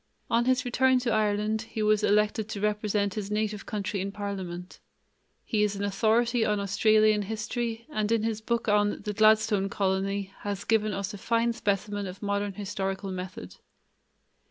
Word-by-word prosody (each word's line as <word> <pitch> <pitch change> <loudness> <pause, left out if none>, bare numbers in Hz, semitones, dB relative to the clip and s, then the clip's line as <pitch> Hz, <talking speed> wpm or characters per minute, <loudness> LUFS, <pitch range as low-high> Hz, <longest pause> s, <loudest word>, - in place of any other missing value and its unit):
On 235 +1 +3
his 255 0 +2
return 260 +1 +3
to 240 -2 0
Ireland 215 0 +1
he 220 -1 -4
was 215 0 +3
elected 210 +1 +2
to 210 - -4
represent 210 -1 0
his 205 -1 -4
native 210 -1 -2
county 200 -2 -2
in 195 +1 -3
parliament. 190 -3 -6 0.7
He 215 -3 0
is 210 -1 +1
an 200 - -4
authority 225 +4 +2
on 210 -2 +1
Australian 215 +2 +3
history 225 +2 -3
and 215 -8 -2
in 230 -2 +2
his 220 -1 -1
book 235 +1 -1
on 205 0 +2
The 210 - -3
Gladstone 215 -2 +4
Colony 195 0 -1
has 205 -1 -4
given 215 -1 +2
us 200 +2 -3
a 205 - -8
fine 235 +2 +1
specimen 205 -1 -1
of 185 +3 -9
modern 200 0 -1
historical 195 -1 -3
method. 180 - -7
210 Hz, 165 wpm, -28 LUFS, 200-220 Hz, 0.7 s, Gladstone